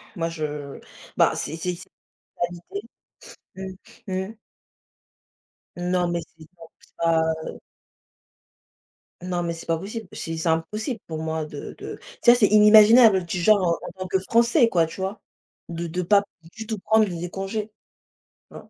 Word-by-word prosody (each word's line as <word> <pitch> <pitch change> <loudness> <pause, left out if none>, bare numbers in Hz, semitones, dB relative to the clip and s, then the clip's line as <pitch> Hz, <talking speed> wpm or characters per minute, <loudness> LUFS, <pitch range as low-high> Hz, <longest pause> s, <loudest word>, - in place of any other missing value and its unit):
moi 165 -1 -2
je 150 -3 -5 0.4
bah, - - +3
c 160 - -4
c 175 +2 -3
c - - -11 0.6
alité 175 - -8 0.7
Mmh, 190 +1 -10
mmh. 190 +4 -4 1.4
Non, 180 0 0
mais, 170 0 -1 0.2
c'est 155 - -13
pour 165 -1 -14 0.3
ça, 165 -1 +3 0.3
heu. - - -8 1.6
Non, 180 -1 -2
mais 170 0 -2
c'est 165 - -9
pas 165 -1 0
possible. 215 +5 -7
C'est 165 0 -5
c'est 160 +1 -1
impossible 215 - -2
pour 160 -1 -5
moi 160 -1 -2
de 145 -1 -8
de - - -7 0.2
tu 240 - +8
sais, - - +6
c'est 215 -4 +4
inimaginable. 210 -1 +7
Tu, 175 +2 -3
genre, 210 +4 +5 0.3
heu, - - -6
en - - -7
tant 185 - -3
que 190 +1 +1
Français, 235 - +3
quoi, 170 -6 +2
tu 160 - -10
vois, 190 +3 -4 0.5
de 170 0 -4
de 180 +3 -3
pas 200 +3 +4 0.3
du 220 -1 -9
tout 220 -3 -3
prendre 220 +2 +3
les 175 -1 -5
congés. 195 +3 -4 0.8
Tu - - -11
vois? - - -14
180 Hz, 165 wpm, -24 LUFS, 165-215 Hz, 1.6 s, tu